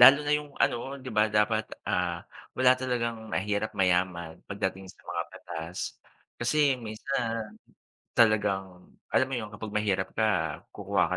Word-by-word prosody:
Lalo 135 +3 +11
na 145 - +2
'yong 150 -1 -6
ano - - +4 0.3
'di 130 - -7
ba 105 +1 +3
dapat, 105 +1 +3 0.2
ah, - - 0 0.4
wala 125 0 +6
talagang 115 -3 -2
mahirap-mayaman, 95 -5 0
pagdating 95 -1 -2
sa - - -24
mga - - -1
batas. 85 +3 -5 0.4
Kasi 140 +3 +3
minsan, 115 -1 -3 0.6
talagang 100 -5 +2 0.2
alam 130 - +4
mo - - -4
'yon 110 -2 -4
kapag 105 0 -6
mahirap 100 -3 +1
ka, 90 -9 +1
kukuha 100 -1 +1
105 Hz, 135 wpm, -29 LUFS, 95-120 Hz, 0.6 s, Lalo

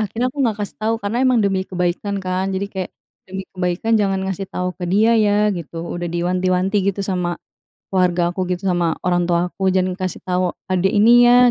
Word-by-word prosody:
akhirnya 220 +4 -1
aku - - -10
nggak 225 -5 +1
kasih 205 -1 -5
tahu, 220 +1 +1
karena 225 +3 -2
emang 255 -2 +4
demi 195 -1 +1
kebaikan, 185 +2 -2
kan. 185 0 -2
Jadi 190 +1 -2
kayak, 190 -2 -4 0.4
"Demi 190 0 -5
kebaikan, 180 +5 0
jangan 200 -3 +2
ngasih 190 0 -4
tahu 180 0 -3
ke - - -12
dia, 215 +4 +4
ya," 210 -1 +3
gitu. 170 -1 -7
Udah 175 0 -4
diwanti-wanti, 185 +3 0
gitu, 200 0 -5
sama 180 -2 -2 0.5
keluarga 180 -2 +2
aku, 185 +1 -2
gitu, 180 +1 -3
sama 170 -2 +1
orang 175 -1 +1
tua 175 0 +1
aku, 190 0 0
"Jangan 185 0 0
kasih 185 -2 -4
tahu 180 -1 -1 0.2
adik 185 +3 +1
ini 235 +4 +6
ya," 245 0 +6
190 Hz, 200 wpm, -20 LUFS, 180-205 Hz, 0.5 s, ini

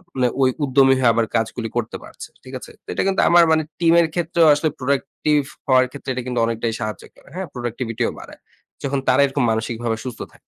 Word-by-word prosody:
মানে 130 -1 +2
ওই 130 - +5
উদ্যমী 135 -1 +4
হয়ে 125 -2 +4
আবার 115 0 +1
কাজগুলি 115 0 -1
করতে 120 -2 -2
পারছে। - - -11
ঠিক - - -12
আছে? - - -12
তো - - -64
এটা - - 0
কিন্তু 195 0 +2
আমার 175 0 +7
মানে 160 0 +3 0.2
টিমের 170 0 +4
ক্ষেত্রেও 170 -1 +2
আসলে 150 +2 +1
প্রোডাক্টিভ 140 +2 0 0.3
হওয়ার 130 -1 +5
ক্ষেত্রে 140 -1 -8
এটা 130 0 -4
কিন্তু 125 -1 -1
অনেকটাই 115 0 -2
সাহায্য 110 -2 -5
করে, - - -22
হ্যাঁ? 190 0 -4
প্রোডাক্টিভিটিও 120 -1 -3
বাড়ায়। - - -13 0.4
যখন 140 0 -1
তারা 130 +2 +4
এরকম 140 -1 -1
মানসিকভাবে 115 +1 -2
সুস্থ 125 -3 -6
থাকে। - - -21
130 Hz, 200 wpm, -21 LUFS, 115-150 Hz, 0.4 s, আমার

